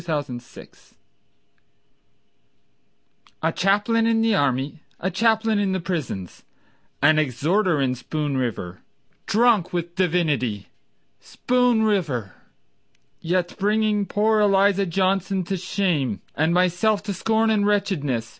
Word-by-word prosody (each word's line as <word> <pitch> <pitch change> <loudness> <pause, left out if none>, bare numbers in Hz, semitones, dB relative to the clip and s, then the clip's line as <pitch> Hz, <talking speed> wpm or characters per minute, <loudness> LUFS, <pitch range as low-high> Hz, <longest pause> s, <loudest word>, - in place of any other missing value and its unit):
Ezra 165 -2 -2
Bartlett 125 -5 -9 2.5
A 160 - +2
chaplain 205 +6 +1
in 225 -1 +2
the 225 -1 +2
army, 140 -2 -1 0.2
A 190 - -2
chaplain 220 +2 +2
in 195 -2 0
the 190 - -1
prisons, 155 - -5 0.6
An 155 +1 +5
exhorter 155 - +1
in 130 -2 +1
Spoon 145 +3 -3
River, 105 -8 -4 0.5
Drunk 220 -5 +3
with 175 -1 -3
divinity, 155 - -1 0.5
Spoon 245 -2 +1
River— 155 - -1 0.9
Yet 175 +1 -1
bringing 210 0 +1
poor 215 +1 +1
Eliza 200 -1 +3
Johnson 190 +1 0
to 190 +3 -3
shame, 170 - -1
And 160 +2 +1
myself 185 +4 +1
to 205 -1 -3
scorn 220 +4 +1
and 205 -2 +2
wretchedness. 165 - -1
185 Hz, 115 wpm, -23 LUFS, 150-210 Hz, 2.5 s, An